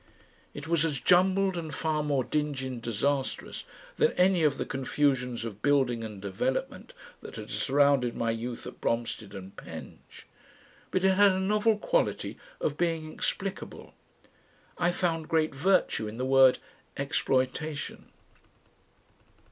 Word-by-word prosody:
It 145 Hz, +2 st, -7 dB
was 165 Hz, -1 st, +2 dB
as 150 Hz, -5 st, -1 dB
jumbled 190 Hz, +3 st, +3 dB
and 165 Hz, -3 st, -4 dB
far 155 Hz, +1 st, -1 dB
more 145 Hz, -3 st, +1 dB
dingy 145 Hz, -1 st, -2 dB
and 130 Hz, -2 st, -5 dB
disastrous 130 Hz, +5 st, -2 dB, 0.3 s
than 465 Hz, -, +3 dB
any 180 Hz, -1 st, +3 dB
of 145 Hz, -2 st, +3 dB
the -, -, -2 dB
confusions 130 Hz, -3 st, 0 dB
of 105 Hz, -2 st, -7 dB
building 130 Hz, -5 st, +2 dB
and 105 Hz, -3 st, -7 dB
development 260 Hz, -, -3 dB, 0.3 s
that -, -, -10 dB
had -, -, -8 dB
surrounded 140 Hz, -3 st, +2 dB
my 115 Hz, -1 st, 0 dB
youth 115 Hz, +1 st, -5 dB
at -, -, -9 dB
Bromstead 115 Hz, -4 st, -2 dB
and 95 Hz, 0 st, -9 dB
Penge, -, -, -11 dB, 0.6 s
but 185 Hz, -, 0 dB
it 190 Hz, 0 st, +5 dB
had 200 Hz, -1 st, +6 dB
a 185 Hz, -, -1 dB
novel 210 Hz, +3 st, +2 dB
quality -, -, 0 dB, 0.2 s
of 145 Hz, -, -1 dB
being 165 Hz, -2 st, -1 dB
explicable. 195 Hz, 0 st, -4 dB, 0.8 s
I 175 Hz, 0 st, +1 dB
found 165 Hz, -3 st, -1 dB
great 160 Hz, -2 st, +2 dB
virtue 145 Hz, -, +2 dB
in 105 Hz, +2 st, -7 dB
the 130 Hz, -, -2 dB
word 135 Hz, -1 st, +6 dB, 0.4 s
"exploitation." 140 Hz, +2 st, -1 dB
145 Hz, 140 wpm, -29 LUFS, 125-175 Hz, 0.8 s, had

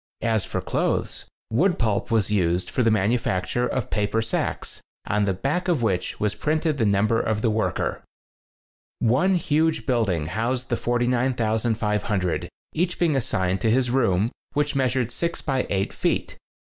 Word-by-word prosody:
As 110 Hz, -3 st, +1 dB
for -, -, -3 dB
clothes, -, -, -1 dB, 0.3 s
wood 175 Hz, -, +2 dB
pulp 110 Hz, -4 st, 0 dB
was 110 Hz, -3 st, +1 dB
used 90 Hz, -3 st, +1 dB
for -, -, 0 dB
the 115 Hz, -, +4 dB
manufacture 110 Hz, +1 st, +1 dB
of 130 Hz, -4 st, -3 dB
paper 105 Hz, +1 st, 0 dB
sacks, 115 Hz, 0 st, -2 dB, 0.3 s
on 105 Hz, 0 st, +1 dB
the 95 Hz, -, +1 dB
back 145 Hz, -, -1 dB
of 165 Hz, -9 st, +1 dB
which 95 Hz, -5 st, -1 dB
was 105 Hz, -1 st, 0 dB
printed 155 Hz, -1 st, 0 dB
the 110 Hz, -, +3 dB
number 105 Hz, +3 st, +2 dB
of 110 Hz, -1 st, -1 dB
the 115 Hz, -, +3 dB
worker. 110 Hz, +1 st, -1 dB, 1.0 s
One 135 Hz, +12 st, +3 dB
huge 160 Hz, -1 st, +1 dB
building 110 Hz, -, +1 dB
housed 120 Hz, +8 st, -2 dB
the 120 Hz, -, +1 dB
49, 120 Hz, +2 st, +1 dB
500, 110 Hz, -4 st, 0 dB, 0.2 s
each 175 Hz, +2 st, 0 dB
being 165 Hz, -4 st, +2 dB
assigned 95 Hz, -8 st, 0 dB
to 110 Hz, -, +2 dB
his 125 Hz, +1 st, +2 dB
room 115 Hz, -4 st, +2 dB, 0.2 s
which 145 Hz, -1 st, 0 dB
measured 130 Hz, -3 st, +1 dB
six 170 Hz, +6 st, -3 dB
by 135 Hz, -3 st, 0 dB
eight 95 Hz, 0 st, -1 dB
feet. -, -, -1 dB
115 Hz, 160 wpm, -24 LUFS, 105-130 Hz, 1.0 s, the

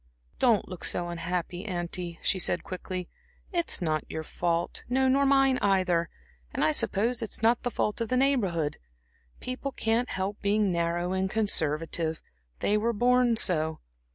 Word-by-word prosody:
"Don't 230 Hz, -5 st, +3 dB
look 180 Hz, -2 st, -8 dB
so 175 Hz, 0 st, 0 dB
unhappy, 175 Hz, +1 st, -3 dB
auntie," 175 Hz, -3 st, -4 dB
she 190 Hz, -, +1 dB
said, -, -, +1 dB
quickly. 185 Hz, -1 st, -5 dB, 0.5 s
"It's 340 Hz, -, +4 dB
not 155 Hz, -2 st, 0 dB
your 160 Hz, -, -4 dB
fault 170 Hz, +1 st, -2 dB
no, 265 Hz, +1 st, +2 dB
nor 275 Hz, +1 st, +3 dB
mine 270 Hz, -1 st, +4 dB
either; 185 Hz, -4 st, +2 dB, 0.4 s
and, -, -, -1 dB
I 155 Hz, -, +4 dB
suppose, 230 Hz, +10 st, 0 dB
it's 225 Hz, 0 st, -2 dB
not 235 Hz, +2 st, +4 dB
the 245 Hz, -, -1 dB
fault 210 Hz, 0 st, -1 dB
of 230 Hz, -, -2 dB
the 255 Hz, -, +1 dB
Neighborhood. 195 Hz, -, +1 dB, 0.6 s
People 255 Hz, +2 st, -4 dB
can't 230 Hz, 0 st, 0 dB
help 195 Hz, +2 st, -3 dB
being 205 Hz, -1 st, +2 dB
narrow 170 Hz, +1 st, -1 dB
and 190 Hz, 0 st, 0 dB
conservative; 160 Hz, -5 st, +1 dB, 0.4 s
they 210 Hz, -, +2 dB
were 230 Hz, +2 st, 0 dB
born 245 Hz, +1 st, +3 dB
so. 160 Hz, -7 st, +1 dB
190 Hz, 155 wpm, -28 LUFS, 170-235 Hz, 0.6 s, It's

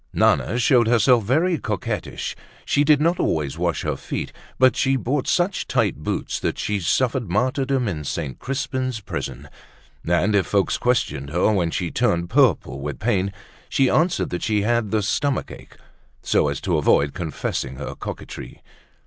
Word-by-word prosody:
Nana 120 Hz, -, +2 dB
showed 120 Hz, -1 st, +4 dB
herself 120 Hz, 0 st, +4 dB
very 160 Hz, -, +1 dB
coquettish. 105 Hz, -5 st, -3 dB, 0.3 s
She 145 Hz, -, +2 dB
did 150 Hz, -1 st, +5 dB
not 170 Hz, +3 st, +2 dB
always 75 Hz, -4 st, -1 dB
wash -, -, -1 dB
her -, -, -1 dB
feet, -, -, -5 dB, 0.2 s
but 130 Hz, -1 st, +5 dB
she 135 Hz, 0 st, +2 dB
bought 130 Hz, +2 st, -1 dB
such 180 Hz, +1 st, +1 dB
tight -, -, +1 dB
boots 75 Hz, -, -3 dB
that -, -, -2 dB
she 105 Hz, -1 st, -1 dB
suffered 120 Hz, +4 st, 0 dB
martyrdom 130 Hz, +4 st, 0 dB
in 80 Hz, -7 st, -3 dB
St. 70 Hz, -3 st, -4 dB
Crispin's 130 Hz, -2 st, -2 dB
prison; 105 Hz, -, -6 dB, 0.6 s
and 90 Hz, +5 st, +1 dB
if 95 Hz, -, +2 dB
folks 100 Hz, -2 st, +1 dB
questioned 110 Hz, -, 0 dB
her 90 Hz, +7 st, +2 dB
when 90 Hz, -5 st, +1 dB
she 85 Hz, 0 st, -2 dB
turned 85 Hz, -8 st, 0 dB
purple 115 Hz, -, +2 dB
with 75 Hz, +2 st, -4 dB
pain, 100 Hz, -4 st, 0 dB, 0.4 s
she 135 Hz, -2 st, +2 dB
answered 170 Hz, +2 st, +1 dB
that 90 Hz, -, -3 dB
she 105 Hz, -2 st, +1 dB
had 115 Hz, -1 st, +1 dB
the 110 Hz, 0 st, 0 dB
stomach 140 Hz, +7 st, -1 dB
ache, -, -, -12 dB, 0.5 s
so -, -, +2 dB
as -, -, -2 dB
to -, -, +1 dB
avoid 70 Hz, 0 st, +3 dB
confessing 75 Hz, -5 st, -3 dB
her -, -, -6 dB
coquetry. -, -, -8 dB
110 Hz, 165 wpm, -22 LUFS, 90-130 Hz, 0.6 s, did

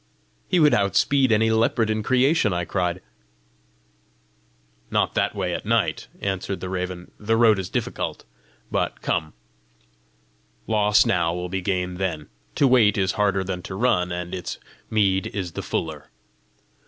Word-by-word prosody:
"He 180 Hz, -, +2 dB
would 150 Hz, -2 st, +5 dB
outspeed 115 Hz, +7 st, +3 dB
any 110 Hz, +1 st, +3 dB
leopard 110 Hz, 0 st, +2 dB
in 110 Hz, 0 st, -1 dB
creation!" 130 Hz, -, +2 dB
I 90 Hz, 0 st, -1 dB
cried. 90 Hz, -1 st, -2 dB, 1.9 s
"Not -, -, +1 dB
that -, -, 0 dB
way -, -, -2 dB
at -, -, -4 dB
night," -, -, 0 dB
answered 95 Hz, 0 st, -2 dB
the 95 Hz, -, -5 dB
raven; 90 Hz, -1 st, -4 dB
"the 110 Hz, +2 st, +1 dB
road 110 Hz, -3 st, +5 dB
is 95 Hz, -, -4 dB
difficult. -, -, -3 dB, 0.5 s
But -, -, -2 dB
come; 80 Hz, -1 st, -1 dB, 1.3 s
loss 105 Hz, -1 st, +3 dB
now 85 Hz, -2 st, +1 dB
will 90 Hz, 0 st, -4 dB
be 95 Hz, +1 st, -2 dB
gain 90 Hz, -1 st, -2 dB
then! 85 Hz, -6 st, -3 dB, 0.3 s
To 140 Hz, -, +4 dB
wait 115 Hz, -6 st, +4 dB
is 95 Hz, -2 st, +1 dB
harder 100 Hz, -2 st, +1 dB
than 90 Hz, -1 st, -4 dB
to 95 Hz, -, -7 dB
run, 90 Hz, -5 st, +1 dB
and 90 Hz, 0 st, -4 dB
its 90 Hz, -1 st, -4 dB, 0.3 s
meed 100 Hz, -3 st, +2 dB
is 95 Hz, -4 st, -3 dB
the -, -, -5 dB
fuller. -, -, -4 dB
95 Hz, 150 wpm, -23 LUFS, 90-110 Hz, 1.9 s, would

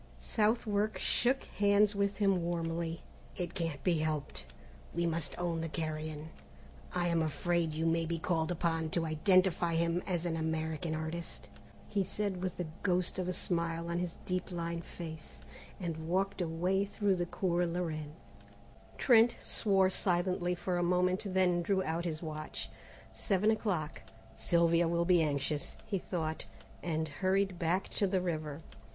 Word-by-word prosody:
Southwark 215 Hz, -1 st, +1 dB
shook 255 Hz, +3 st, +2 dB
hands 205 Hz, +1 st, +3 dB
with 200 Hz, 0 st, 0 dB
him 195 Hz, -3 st, +3 dB
warmly. 165 Hz, -1 st, -2 dB, 0.3 s
"It 180 Hz, -1 st, -3 dB
can't 165 Hz, -5 st, -3 dB
be 170 Hz, -4 st, +2 dB
helped, 155 Hz, -2 st, -2 dB, 0.5 s
we 170 Hz, 0 st, +1 dB
must 165 Hz, -2 st, 0 dB
own 170 Hz, -2 st, -1 dB
the 165 Hz, -, -3 dB
carrion. 155 Hz, -1 st, -4 dB, 0.6 s
I 175 Hz, -1 st, 0 dB
am 170 Hz, -1 st, +2 dB
afraid 160 Hz, +1 st, 0 dB
you 160 Hz, +1 st, 0 dB
may 165 Hz, 0 st, +2 dB
be 170 Hz, 0 st, -1 dB
called 165 Hz, 0 st, 0 dB
upon 165 Hz, -2 st, 0 dB
to 165 Hz, -, +1 dB
identify 170 Hz, +1 st, +3 dB
him 170 Hz, +1 st, +2 dB
as 175 Hz, -2 st, 0 dB
an 170 Hz, -2 st, 0 dB
American 160 Hz, 0 st, -1 dB
artist," 160 Hz, +2 st, -4 dB, 0.4 s
he 200 Hz, -2 st, +1 dB
said 195 Hz, -1 st, -2 dB
with 185 Hz, -1 st, -3 dB
a 180 Hz, -, -1 dB, 0.2 s
ghost 180 Hz, -1 st, +1 dB
of 180 Hz, -, -1 dB
a -, -, +1 dB
smile 170 Hz, -1 st, -1 dB
on 170 Hz, -, 0 dB
his 175 Hz, -1 st, -3 dB
deep 185 Hz, +1 st, -2 dB
lined 170 Hz, -1 st, -3 dB
face; 160 Hz, -2 st, -8 dB, 0.4 s
and 160 Hz, -3 st, -4 dB
walked 195 Hz, +2 st, +1 dB
away 180 Hz, +4 st, +1 dB
through 200 Hz, -1 st, +1 dB
the 175 Hz, 0 st, -1 dB
Cours 175 Hz, -1 st, 0 dB
la 175 Hz, +2 st, -1 dB
Reine. 155 Hz, -3 st, -4 dB, 0.8 s
Trent 235 Hz, -1 st, +5 dB
swore 195 Hz, -3 st, +2 dB
silently 180 Hz, -1 st, +1 dB
for 180 Hz, 0 st, -1 dB
a -, -, +1 dB
moment 180 Hz, +3 st, +2 dB
and 190 Hz, -, -5 dB
then 180 Hz, -2 st, +3 dB
drew 190 Hz, +2 st, +1 dB
out 165 Hz, +1 st, -2 dB
his 160 Hz, -1 st, -3 dB
watch. 155 Hz, -1 st, -5 dB, 0.4 s
Seven 190 Hz, -, +2 dB
o'clock. 185 Hz, -8 st, -1 dB, 0.3 s
"Sylvia 170 Hz, 0 st, +3 dB
will 170 Hz, +1 st, +1 dB
be 175 Hz, -1 st, +5 dB
anxious," 145 Hz, -1 st, -1 dB
he 195 Hz, -, -1 dB
thought, 160 Hz, -3 st, -3 dB, 0.3 s
and 160 Hz, -2 st, -1 dB
hurried 190 Hz, +3 st, 0 dB
back 175 Hz, +3 st, +1 dB
to 200 Hz, -, +1 dB
the 185 Hz, 0 st, +1 dB
river. 155 Hz, -4 st, -3 dB
175 Hz, 160 wpm, -33 LUFS, 160-185 Hz, 0.8 s, Trent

